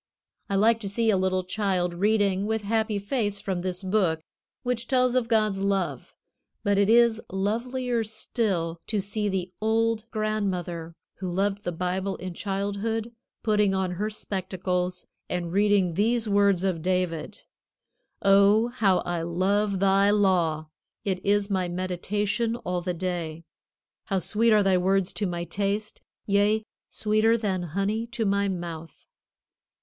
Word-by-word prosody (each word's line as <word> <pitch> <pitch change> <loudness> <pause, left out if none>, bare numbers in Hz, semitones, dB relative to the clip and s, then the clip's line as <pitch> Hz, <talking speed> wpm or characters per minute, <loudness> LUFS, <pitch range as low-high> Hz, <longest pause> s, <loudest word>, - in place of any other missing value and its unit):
I 200 - 0
like 220 +3 +4
to 200 -3 -5
see 225 +2 +2
a - - +3
little 185 0 +1
child 185 -2 -1
reading 200 +1 +1
with 220 -1 -1
happy 220 0 0
face 205 -1 -1
from 190 -3 -3
this 185 +1 -3
book 185 -4 +1 0.4
which 245 -1 -2
tells 255 -1 +3
of 250 -2 +1
God's 215 -4 +2
love; 190 -9 -1 0.5
but 200 -1 +2
it 200 0 +3
is 230 -1 +5
lovelier 235 +5 -1
still 205 -6 -2
to 215 - 0
see 205 +2 -2
the 185 -2 -2
old 225 0 +1
grandmother, 185 -7 -2 0.2
who 185 -2 -3
loved 200 +3 -1
the 175 - -2
Bible 185 +3 -2
in 185 -1 -6
childhood, 205 +4 -2 0.3
putting 210 -3 +2
on 190 -1 0
her 205 +4 -2
spectacles 185 -3 -3 0.2
and 175 -2 -2
reading 200 -3 +3
these 225 +5 +1
words 200 -3 +3
of 185 -4 0
David: 180 +1 -2 0.8
"Oh, 200 +3 +5
how 200 -7 +2
I 175 -1 -2
love 195 +4 +1
thy 195 +1 +4
law! 175 -7 +2 0.4
It 185 -2 -1
is 200 0 +1
my 185 -2 +1
meditation 200 +5 -1
all 180 -6 -3
the 180 0 -2
day. 170 -2 -3 0.6
How 195 - 0
sweet 225 +5 +2
are 210 -1 +5
thy 190 -2 +3
words 190 0 +1
to 200 +2 -1
my 175 -1 -3
taste, 200 +4 -3 0.2
yea, 205 +2 +2 0.3
sweeter 220 +2 +2
than 195 -5 -1 0.2
honey 215 +4 0
to 235 -2 -2
my 200 0 +2
mouth!" 170 -4 -6
200 Hz, 145 wpm, -26 LUFS, 180-215 Hz, 0.8 s, is